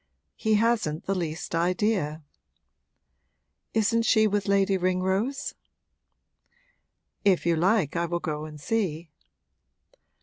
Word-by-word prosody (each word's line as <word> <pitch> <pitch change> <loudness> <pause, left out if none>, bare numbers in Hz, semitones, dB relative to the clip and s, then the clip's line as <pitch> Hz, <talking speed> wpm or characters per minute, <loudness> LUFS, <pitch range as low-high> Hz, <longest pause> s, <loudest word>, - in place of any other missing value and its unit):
'He 220 -1 +1
hasn't 215 -8 +1
the 195 - 0
least 165 -4 -4
idea.' 175 -2 0 1.5
'Isn't 225 +1 +2
she 220 -1 +4
with 205 -1 0
Lady 195 0 +3
Ringrose?' 190 +8 -1 1.7
'If 195 -5 +3
you 170 -1 +3
like 180 -2 +2
I 170 0 0
will 175 +1 -2
go 155 -3 -4
and 150 -1 -10
see.' 170 -4 -2
185 Hz, 105 wpm, -26 LUFS, 165-215 Hz, 1.7 s, she